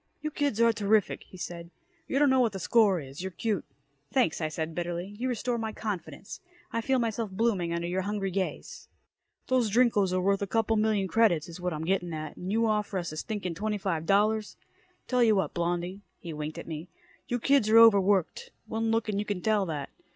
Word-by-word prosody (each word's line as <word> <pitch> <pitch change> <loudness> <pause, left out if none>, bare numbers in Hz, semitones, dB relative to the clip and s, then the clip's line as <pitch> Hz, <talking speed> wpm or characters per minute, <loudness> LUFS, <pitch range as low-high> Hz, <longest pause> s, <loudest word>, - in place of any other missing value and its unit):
"You 305 - -4
kids 285 -7 -1
are 230 0 +5
terrific," 210 -1 +1
he 185 - -12
said. 170 -1 -6 0.4
"You - - -1
don't 285 -1 +4
know 260 - +4
what 235 -4 +2
the 195 - -5
score 200 -1 +3
is. 135 +1 -8
You're 190 - -3
cute!" 200 +1 -2 0.5
"Thanks," 245 -11 +1
I 155 - +1
said 160 +1 -4
bitterly. 175 +3 -4
"You 255 +1 -1
restore 245 0 -1
my 220 -1 -3
confidence. 195 -6 -6 0.3
I 230 - 0
feel 265 +3 +1
myself 230 -2 -1
blooming 190 -4 0
under 170 0 -2
your 185 +2 -1
hungry 200 0 -2
gaze." 190 0 -4 0.6
"Those 255 -4 +2
Drinkos 210 -4 +3
are 185 - +1
worth 195 +2 +1
a 200 - -1
couple 225 +1 +1
million 215 -2 +1
credits, 185 -7 +3
is 170 +1 -9
what 180 0 -1
I'm 155 0 -4
getting 175 -2 0
at, 155 0 -6
and 180 +2 -5
you 225 +2 +2
offer 210 -2 0
us 175 -3 -3
a 155 - -7
stinkin' 200 -2 -3
twenty 210 +4 -2
five 170 -5 -2
dollars. 210 +2 +2 0.5
Tell 250 -1 +2
you 220 -2 +5
what, 190 - 0
Blondie." 175 +2 -2 0.2
He 170 -3 -7
winked 150 +1 -5
at - - -7
me. 160 +1 -6 0.4
"You 245 - 0
kids 260 -2 +3
are 225 - +6
over 225 -3 +8
worked. 190 -2 0 0.2
One 225 0 -2
look 225 0 +1
and 205 -2 -1
you 210 - -2
can 205 -3 -2
tell 210 -3 +2
that. 145 -4 -4
200 Hz, 215 wpm, -28 LUFS, 175-225 Hz, 0.6 s, over